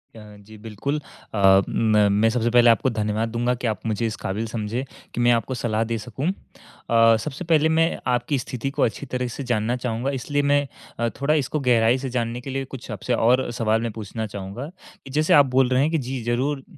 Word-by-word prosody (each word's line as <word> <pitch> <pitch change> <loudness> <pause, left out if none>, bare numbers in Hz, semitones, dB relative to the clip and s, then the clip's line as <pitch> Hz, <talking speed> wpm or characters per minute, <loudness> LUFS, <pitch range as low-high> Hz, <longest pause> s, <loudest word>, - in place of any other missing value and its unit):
अ, - - -10 0.3
जी, 110 0 -13
बिल्कुल। 115 +8 -4 0.3
अ, 95 -2 +5
म 105 -2 +3
मैं 115 +1 +4
सबसे 120 0 0
पहले 120 0 +6
आपको 115 +3 +3
धन्यवाद 110 0 -1
दूँगा 120 +2 0
कि 120 -1 -3
आप 110 -4 -1
मुझे 110 +1 -1
इस 110 - -4
क़ाबिल 105 +4 -2
समझे 115 +3 -3 0.3
कि 120 - -2
मैं 120 0 +5
आपको 120 +2 0
सलाह 115 -2 -1
दे 115 - 0
सकूँ। 125 +7 -5 0.6
अ, 115 -1 +6
सबसे 155 +3 -6
पहले 160 -1 +3
मैं 165 +1 +2
आपकी 125 +3 0
स्थिति 125 +1 -4
को 145 - -3
अच्छी 115 +5 -1
तरह 125 -1 -1
से 140 - -4
जानना 110 +2 +1
चाहूँगा 125 +1 -2
इसलिए 145 +3 -1
मैं 145 0 +2 0.3
अ, 115 0 +1
थोड़ा 145 +2 +2
इसको 150 0 0
गहराई 120 -1 +3
से 130 0 -4
जानने 120 0 -2
के 135 - -8
लिए 135 0 -3
कुछ 130 -1 -10
आपसे 105 +4 -3
और 125 +3 +2
सवाल 110 -1 0
मैं 115 -1 -2
पूछना 110 +1 -5
चाहूँगा, 100 +7 -7 0.4
कि 135 - -10
जैसे 155 +3 +2
आप 145 -1 +7
बोल 130 0 +2
रहे 130 +1 +3
हैं 155 +3 +1
कि 165 - +2
जी 130 -1 -4
ज़रूर 130 +4 -1
120 Hz, 220 wpm, -23 LUFS, 110-135 Hz, 0.6 s, आप